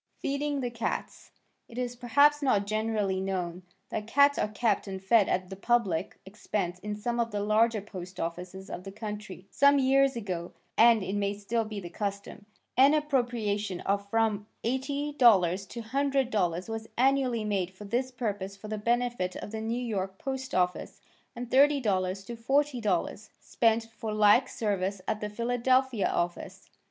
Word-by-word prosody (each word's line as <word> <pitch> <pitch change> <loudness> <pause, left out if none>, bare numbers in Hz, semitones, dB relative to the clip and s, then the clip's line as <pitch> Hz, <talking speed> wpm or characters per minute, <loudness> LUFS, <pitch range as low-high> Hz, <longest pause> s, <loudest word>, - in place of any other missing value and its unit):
Feeding 280 0 -2
the 245 -1 -2
Cats 230 -1 -4 0.4
It 235 - -12
is 245 -1 -2
perhaps 285 +5 +4
not 210 -8 +2
generally 215 -2 -1
known 180 -2 -3 0.3
that 210 0 -4
cats 280 +4 +4
are - - +1
kept 215 +1 0
and 190 -1 -5
fed 195 +2 +3
at 185 0 -1
the - - -5
public 200 -5 0
expense 190 -2 -3
in 210 +2 -4
some 235 +3 -2
of 230 -1 +1
the 205 -2 -3
larger 215 +1 +2
post 185 -3 -9
offices 180 +3 -5
of 180 - -6
the 195 - -8
country. 210 -3 -7
Some 280 0 +5
years 270 0 +3
ago 185 -6 -4 0.2
(and 230 -2 +6
it 190 - -3
may 200 0 0
still 220 +3 -1
be 215 -1 -5
the 175 -3 -8
custom) 200 +1 -5 0.3
an 275 +4 +6
appropriation 235 -9 -1
of 200 0 -1
from 215 -2 +1 0.2
$80 280 +4 -2
to 195 -2 +4
$100 225 -9 0
was 225 0 -5
annually 255 -3 +2
made 195 -4 -1
for 190 +2 -12
this 245 +5 -1
purpose 205 -6 -4
for 215 +2 -9
the 215 -1 -3
benefit 235 -4 0
of - - -7
the 220 0 -4
New 235 +3 -2
York 190 -4 -3
post 265 +1 -4
office, 180 -1 -1 0.4
and 245 +1 -5
$30 210 -9 +2
to 235 - -6
$40, 230 - 0
spent 225 -1 +1
for 220 -1 -4
like 215 +4 +4
service 200 -3 -2
at 215 - -1
the 210 - -3
Philadelphia 245 +1 +1
office. 175 0 -3
215 Hz, 165 wpm, -29 LUFS, 195-245 Hz, 0.4 s, and